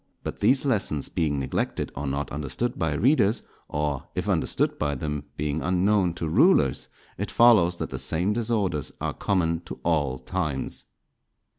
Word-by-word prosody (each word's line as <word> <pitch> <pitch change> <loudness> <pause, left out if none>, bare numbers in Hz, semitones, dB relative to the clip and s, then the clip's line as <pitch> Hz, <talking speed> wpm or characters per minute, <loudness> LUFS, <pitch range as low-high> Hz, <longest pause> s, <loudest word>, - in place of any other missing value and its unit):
But - - -5
these 135 +2 +3
lessons 100 - 0
being 75 -3 0
neglected 65 - -2
or 70 - -4
not 70 +2 -2
understood 75 - -3
by 80 -3 0
readers, 120 - +3 0.3
or, 75 0 -2
if 90 +2 -2
understood 90 -5 0
by 70 -1 0
them, 75 +1 -4
being 75 +1 -1
unknown 95 0 +2
to 80 - -3
rulers, 80 - +3 0.3
it - - -2
follows 105 -8 +5
that - - -4
the - - -4
same 90 +6 0
disorders 105 - -1
are - - -2
common 85 -5 0
to - - -8
all 75 -6 +1
times. 75 0 -3
80 Hz, 155 wpm, -26 LUFS, 75-100 Hz, 0.3 s, follows